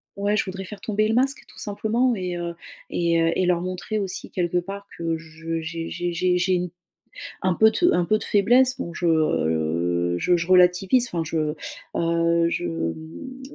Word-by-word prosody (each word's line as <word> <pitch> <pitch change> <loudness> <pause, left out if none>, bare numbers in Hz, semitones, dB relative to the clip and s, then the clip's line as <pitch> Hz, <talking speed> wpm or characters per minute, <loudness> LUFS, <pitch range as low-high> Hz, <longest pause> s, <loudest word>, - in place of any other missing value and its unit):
ouais, 205 +1 0
je - - +1
voudrais 190 0 -5
faire 205 +2 -9
tomber 215 0 +1
le 225 - +1
masque 270 +3 +2
tout - - -15
simplement, 225 +4 0
et 180 -3 -3
heu, 170 0 -4 0.4
et 170 -1 +2
heu, 165 0 +3
et 185 - +1
leur 175 -1 +2
montrer 185 +4 -3
aussi 195 -3 -4
quelque 180 -1 0
part 200 +3 -7
que 165 -1 -1
je 165 0 -5
j'ai 165 +1 -5
j'ai 175 0 -3
j'ai 180 +1 +2
j'ai 180 +1 +1
une 180 0 -1 0.7
un 185 -1 +3
peu 220 +5 +6
de 350 +9 +3
un 175 - +2
peu 215 +4 +3
de - - -5
faiblesse. 250 +6 +4
Donc 170 - -5
je, 175 - -2
heu, 85 - +1
je 180 - +3
je 170 0 -3
relativise 185 +7 +4
enfin 170 -8 -2
je, 155 -1 -1 0.4
heu, 170 0 +2
je, - - -2
mmh, 160 - -5
180 Hz, 195 wpm, -24 LUFS, 165-200 Hz, 0.7 s, peu